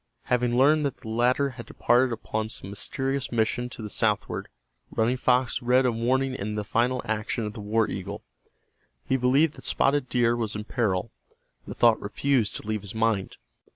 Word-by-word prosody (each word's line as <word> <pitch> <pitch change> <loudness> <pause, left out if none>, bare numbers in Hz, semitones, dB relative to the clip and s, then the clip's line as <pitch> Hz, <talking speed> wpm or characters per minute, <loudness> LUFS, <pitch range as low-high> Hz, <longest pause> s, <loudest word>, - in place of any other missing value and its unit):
Having 125 -1 +1
learned 150 +4 +5
that 135 - -6
the 110 - -10
latter 125 +5 +2
had 115 -2 -10
departed 125 +2 +2
upon 110 -1 -3
some 100 - -8
mysterious 135 +6 -2
mission 120 +1 0
to 115 - -9
the 105 - -5
southward, - - -1 0.4
Running 115 +3 +1
Fox 125 0 +1
read 125 +2 +3
a 125 - +3
warning 130 +3 0
in 105 -3 -4
the 105 - -2
final 120 +4 0
action 110 +1 -2
of 105 - -5
the 110 - -8
war 110 +2 +1
eagle. 100 +1 -6 0.8
He 130 - +1
believed 135 +5 +3
that - - -12
Spotted 140 -1 +1
Deer 120 -1 +2
was 115 -3 -3
in 105 - -4
peril. 105 -3 -1 0.6
The - - -6
thought 115 -2 +4
refused 115 +1 0
to - - -7
leave 110 -1 -1
his 100 +1 -8
mind. 110 -3 0
120 Hz, 185 wpm, -26 LUFS, 110-130 Hz, 0.8 s, learned